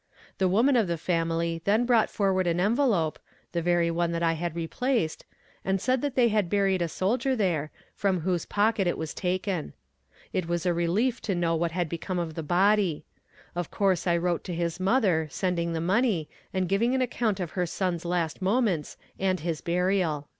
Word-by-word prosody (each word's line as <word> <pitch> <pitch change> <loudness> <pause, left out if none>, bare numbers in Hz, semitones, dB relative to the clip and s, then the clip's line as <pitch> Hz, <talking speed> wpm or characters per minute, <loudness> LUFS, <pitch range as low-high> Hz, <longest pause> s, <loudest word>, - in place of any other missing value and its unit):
The 190 - +3
woman 230 +9 +3
of 225 -5 +3
the 170 -1 -1
family 165 0 -1
then 215 +5 +2
brought 235 -3 +3
forward 190 -3 +1
an 170 0 +1
envelope, 205 - +2 0.3
(the 170 - -1
very 170 0 +2
one 170 0 0
that 170 0 -1
I 165 -1 +3
had 170 0 -3
replaced), 170 - -1 0.4
and 190 0 0
said 255 +5 +1
they 260 -4 +2
had 210 -5 +1
buried 195 -2 +2
a 170 - +1
soldier 240 - 0
there, 170 - 0 0.2
from 190 -4 0
whose 175 0 -1
pocket 210 -1 +2
it 175 - 0
was 160 -1 -4
taken. 185 -2 -2 0.6
It 185 -3 -1
was 175 +1 -1
a 175 - +3
relief 195 +9 0
to 195 - -1
know 170 -1 +1
what 165 0 -1
had 175 -1 0
become 170 +3 -4
of 170 -2 -2
the 165 - -4
body. 185 +1 +2 0.5
Of 175 -2 -3
course 190 -3 +1
I 170 -1 +3
wrote 175 0 -1
to 180 - -4
his 170 0 -2
mother, 190 -6 +2
sending 170 +1 -1
the 165 - -1
money, 190 -2 +1 0.2
and 185 -1 0
giving 230 +7 +2
an 260 - +2
account 230 -5 -1
of 175 -3 -3
her 180 -2 -1
son's 175 -1 -2
last 170 0 -1
moments, 190 - 0 0.2
and 185 -2 0
his 165 -1 -2
burial." 175 -4 0
180 Hz, 190 wpm, -27 LUFS, 170-205 Hz, 0.6 s, The